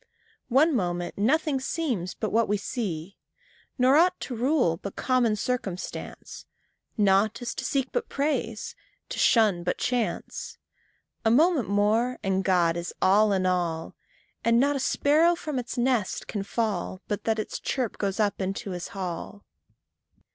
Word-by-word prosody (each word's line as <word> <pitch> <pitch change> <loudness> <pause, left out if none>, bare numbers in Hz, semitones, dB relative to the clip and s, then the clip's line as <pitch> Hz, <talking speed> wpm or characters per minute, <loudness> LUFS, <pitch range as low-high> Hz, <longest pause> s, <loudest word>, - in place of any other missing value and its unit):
One 295 +6 +4
moment 175 -4 -2
nothing 275 +6 +1
seems 260 - -2
but 215 - -3
what 230 +1 +2
we 210 - +1
see, 195 -5 -4 0.6
Nor 260 +2 +5
aught 360 +2 +4
to 250 - -4
rule 245 - +2
but 200 +3 -7
common 250 -4 +2
circumstance 210 -5 -5 0.5
Nought 205 +2 +3
is 240 - -3
to - - -5
seek 270 -2 -1
but 475 -1 -2
praise, 275 -6 -2 0.4
to - - -5
shun 215 -7 +4
but 180 - -1
chance; 245 -3 -2 0.7
A 225 - +3
moment 295 - +3
more, 215 +5 +2
and 190 -1 0
God 175 -3 +2
is 170 0 -5
all 205 +3 +4
in 190 -2 +1
all, 175 -3 -1 0.5
And 230 0 +4
not 285 +2 +3
a - - -1
sparrow 310 +6 +3
from 305 -5 -3
its 245 0 -6
nest 240 -5 0
can 205 - -4
fall 200 -3 -2
But 205 - -2
from - - -43
the 225 - +2
ground - - -5
its - - -6
chirp 255 -5 -2
goes 200 0 -1
up 205 -2 +1
into 195 +1 -3
his 180 -1 -5
hall. 185 +2 -5
220 Hz, 160 wpm, -26 LUFS, 190-260 Hz, 0.7 s, Nor